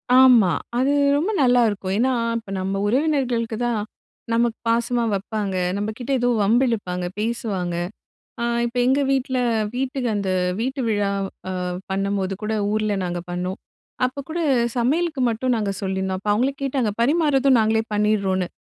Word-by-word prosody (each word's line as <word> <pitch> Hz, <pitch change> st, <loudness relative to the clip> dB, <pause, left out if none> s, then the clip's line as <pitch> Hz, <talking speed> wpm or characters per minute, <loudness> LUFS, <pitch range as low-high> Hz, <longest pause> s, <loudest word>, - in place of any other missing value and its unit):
ஆமா. 250 Hz, -8 st, +7 dB, 0.3 s
அது 265 Hz, +3 st, +2 dB, 0.3 s
ரொம்ப 345 Hz, +9 st, 0 dB
நல்லாயிருக்கும். 230 Hz, -7 st, +2 dB
ஏன்னா 255 Hz, +4 st, +2 dB, 0.3 s
இப்ப 220 Hz, -3 st, -16 dB
நம்ம 195 Hz, +1 st, -2 dB
உறவினர்களுக்கு 250 Hz, -4 st, 0 dB
தான் 235 Hz, -3 st, 0 dB, 0.5 s
நமக்கு 235 Hz, 0 st, +1 dB
பாசமா 235 Hz, +1 st, +1 dB
வப்பாங்க. 200 Hz, 0 st, -2 dB, 0.2 s
நம்மகிட்ட 220 Hz, +6 st, -4 dB
ஏதோ 245 Hz, 0 st, +2 dB
வம்பு 225 Hz, +6 st, +3 dB
இழுப்பாங்க. 180 Hz, -6 st, -2 dB
பேசுவாங்க. 210 Hz, -6 st, -2 dB, 0.7 s
அ -, -, 0 dB, 0.2 s
இப்ப 240 Hz, +1 st, -4 dB
எங்க 265 Hz, +3 st, +3 dB
வீட்ல 260 Hz, -1 st, 0 dB, 0.4 s
வீட்டுக்கு 260 Hz, -1 st, -1 dB
அந்த 200 Hz, -2 st, -1 dB, 0.3 s
வீட்டு 265 Hz, +4 st, -2 dB
விழா 205 Hz, -2 st, +1 dB, 0.4 s
அ -, -, -2 dB, 0.4 s
பண்ணும்போது 195 Hz, 0 st, -1 dB
கூட 215 Hz, +1 st, -1 dB, 0.2 s
ஊர்ல 215 Hz, -1 st, 0 dB
நாங்க 175 Hz, -1 st, -2 dB
பண்ணோம். 180 Hz, +2 st, -3 dB, 0.5 s
அப்ப 255 Hz, +2 st, -4 dB
கூட 335 Hz, +2 st, -3 dB, 0.4 s
சமையலுக்கு 300 Hz, +4 st, +1 dB
மட்டும் 245 Hz, +3 st, 0 dB
நாங்க 210 Hz, -3 st, -1 dB
சொல்லிர்ந்தோம். 190 Hz, -1 st, -2 dB
அப்போ 205 Hz, -, -4 dB
அவங்களே 255 Hz, +6 st, +1 dB
கேட்டாங்க 260 Hz, -5 st, 0 dB
பரிமாறுதும் 275 Hz, -1 st, +3 dB
நாங்களே 220 Hz, 0 st, +2 dB
பண்ணிடுறோன்னு. 200 Hz, -3 st, +1 dB
230 Hz, 140 wpm, -22 LUFS, 200-255 Hz, 0.7 s, ஆமா